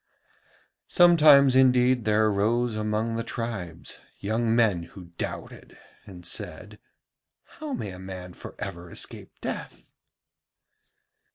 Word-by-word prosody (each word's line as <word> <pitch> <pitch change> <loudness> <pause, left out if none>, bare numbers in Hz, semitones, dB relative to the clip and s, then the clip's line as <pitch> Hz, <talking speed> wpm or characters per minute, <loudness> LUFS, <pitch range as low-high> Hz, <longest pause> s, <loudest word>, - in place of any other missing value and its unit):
Sometimes 150 -6 +6
indeed 125 -2 +4
there 110 0 +3
arose 110 +3 +1
among 110 +1 -1
the 115 - -2
tribes 100 -10 -5 0.2
young 110 +3 0
men 110 -7 +3
who 85 +1 -12
doubted - - -6 0.3
and 90 -3 -11
said: - - -5 0.6
'How 305 -2 -8
may 105 - -4
a 90 - -10
man 90 -1 -8
for - - -10
ever 85 0 -6
escape - - -6
death?' - - -6
110 Hz, 110 wpm, -26 LUFS, 95-125 Hz, 0.6 s, Sometimes